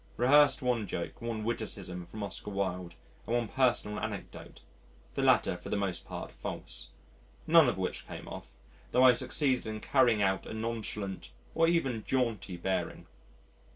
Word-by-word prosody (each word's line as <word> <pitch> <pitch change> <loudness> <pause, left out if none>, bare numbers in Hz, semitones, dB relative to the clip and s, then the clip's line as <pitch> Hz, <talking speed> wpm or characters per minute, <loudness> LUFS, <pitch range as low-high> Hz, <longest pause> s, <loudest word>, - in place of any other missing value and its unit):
Rehearsed 135 +2 +5
one 120 -4 +1
joke, 85 - -5
one 115 -2 -3
witticism 95 -6 -3
from 110 - -6
Oscar 100 +1 -5
Wilde, 90 -3 -3 0.3
and 115 - +1
one 120 -2 +1
personal 120 -4 +1
anecdote 105 -2 -6 0.5
(the - - -1
latter - - +4
for 90 - -9
the - - 0
most 95 -3 -2
part - - -6
false), - - -6 0.6
none 160 -4 +7
of - - -2
which 95 -1 -3
came - - -8
off, - - -8 0.4
tho' 125 - +5
I 130 -1 +9
succeeded 130 0 +1
in 110 0 -4
carrying 120 -4 +3
off 95 0 +1
a - - -6
nonchalant 110 -3 -4 0.2
or 165 0 +4
even 135 -10 +1
jaunty 115 -8 -1
bearing. 95 +2 -2
110 Hz, 155 wpm, -31 LUFS, 100-125 Hz, 0.6 s, I